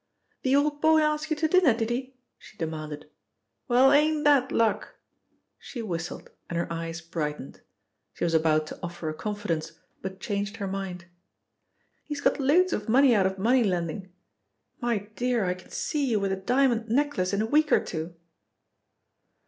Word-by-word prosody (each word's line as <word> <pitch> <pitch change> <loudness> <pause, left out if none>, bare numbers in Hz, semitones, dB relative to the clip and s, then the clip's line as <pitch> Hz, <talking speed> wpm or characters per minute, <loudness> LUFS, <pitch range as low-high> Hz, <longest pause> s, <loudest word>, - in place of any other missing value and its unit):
"The 265 +1 +2
old 290 +1 +1
boy 315 0 +5
asked 305 +1 0
you 310 - +1
to 315 +1 +1
dinner, 320 -8 +4
did 225 0 -2
he?" 255 +2 -4 0.2
she - - -16
demanded. 155 -3 -5 0.6
"Well, 255 +2 +5
ain't 300 +1 +3
that 280 -3 +4
luck!" 225 -2 0 0.6
She 240 -4 -7
whistled 170 -4 -5 0.2
and 170 - -3
her 170 - 0
eyes 165 0 -5
brightened. 150 -4 -5 0.5
She - - -5
was 170 -1 +1
about 155 -1 +3
to - - -9
offer 175 -2 -5
a - - -3
confidence, 165 -3 -3 0.3
but 190 0 -6
changed 205 +1 -3
her 200 - -3
mind. 190 -2 -5 1.0
"He's 295 -1 -5
got 285 - +1
loads 335 +7 +3
of 210 +1 -3
money 260 +2 +5
out 195 -4 +3
of 190 0 -4
money 240 +6 +3
lending. 180 -1 -2 0.7
My 230 -5 -1
dear, 245 -4 0
I 180 - +1
can 185 - -15
see 290 -2 -1
you 220 -3 +2
with 195 -1 -1
a - - +1
diamond 235 +2 +1
necklace 245 -7 +1
in 200 +1 0
a - - 0
week 300 +6 +2
or - - +6
two!" 165 +1 -5
215 Hz, 175 wpm, -27 LUFS, 175-270 Hz, 1.0 s, or